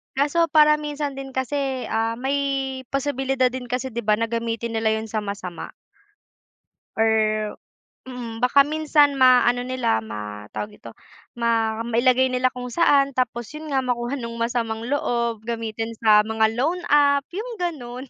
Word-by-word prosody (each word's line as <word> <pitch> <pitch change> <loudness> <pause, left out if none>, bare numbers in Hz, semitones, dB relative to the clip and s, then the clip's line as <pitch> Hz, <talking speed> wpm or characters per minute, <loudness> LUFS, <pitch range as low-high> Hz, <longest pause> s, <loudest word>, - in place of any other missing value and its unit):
kaso 295 +5 +2
para 300 -1 +6
minsan 295 -2 -4
din 270 0 -7
kasi, 265 0 -2
ah, 225 +1 0
may 270 +2 -1 0.6
posibilidad 270 -2 +1
din 255 -1 -6
kasi, 255 +2 -2
'di 235 0 -4
ba, 210 0 +3
na 230 - 0
gamitin 230 0 -3
nila 220 0 +1
'yon 220 0 -3
sa 220 - -3
masama. 200 -4 -6 1.3
Or 225 0 +3 0.9
Mm, 245 -2 -7
baka 280 +3 +5
minsan 300 -2 +3
ma 255 -2 +5
ano 245 0 +2
nila 245 - 0
ma 105 -1 -7
tawag 210 0 -6
dito, - - -12 0.5
ma 225 -1 +1
mailagay 255 +2 +3
nila 255 0 +1
kung 250 0 -7
saan, 280 -1 +3
tapos 240 -2 -1
'yon 305 -1 -7
nga 270 - +2
makuha 250 +1 -2
no'ng 230 -1 -6
masamang 230 -1 -2
loob, 235 -4 -1
gamitin 225 0 -4
sa 210 -1 +7
mga 220 0 +2
loan 320 +10 -1
app, 285 -1 +4
'yong 450 +6 -5
gano'n. 255 -7 -4
250 Hz, 155 wpm, -23 LUFS, 225-275 Hz, 1.3 s, sa